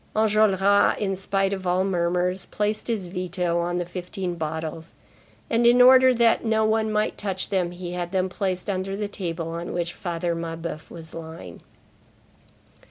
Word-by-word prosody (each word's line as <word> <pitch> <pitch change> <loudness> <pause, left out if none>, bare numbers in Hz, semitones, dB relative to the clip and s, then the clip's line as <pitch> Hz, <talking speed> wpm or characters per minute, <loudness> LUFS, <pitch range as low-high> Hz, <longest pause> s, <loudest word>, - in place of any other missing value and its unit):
—Enjolras, 205 -2 +3
in 195 -2 -1
spite 195 +1 0
of 190 -2 -4
all 180 +1 +2
murmurs, 180 0 0
placed 210 +1 -2
his 220 -6 -1
veto 180 -1 -2
on 175 +1 -1
the 175 - -1
fifteen 180 +1 -5
bottles, 160 0 -5 0.5
and, 235 +1 +3
in 240 +1 +6
order 255 +1 +8
that 235 -2 +3
no 220 -1 +2
one 220 0 +1
might 215 0 0
touch 190 -2 -2
them, 185 -3 0
he 175 0 -7
had 175 -1 -4
them 190 -1 +1
placed 185 -1 -2
under 195 0 -2
the 210 0 -2
table 170 -4 -4
on 170 +1 -5
which 170 -1 -2
Father 170 -1 -3
Mabeuf 165 -1 -5
was 160 -1 -10
lying. 160 - -9
185 Hz, 165 wpm, -24 LUFS, 170-205 Hz, 0.5 s, order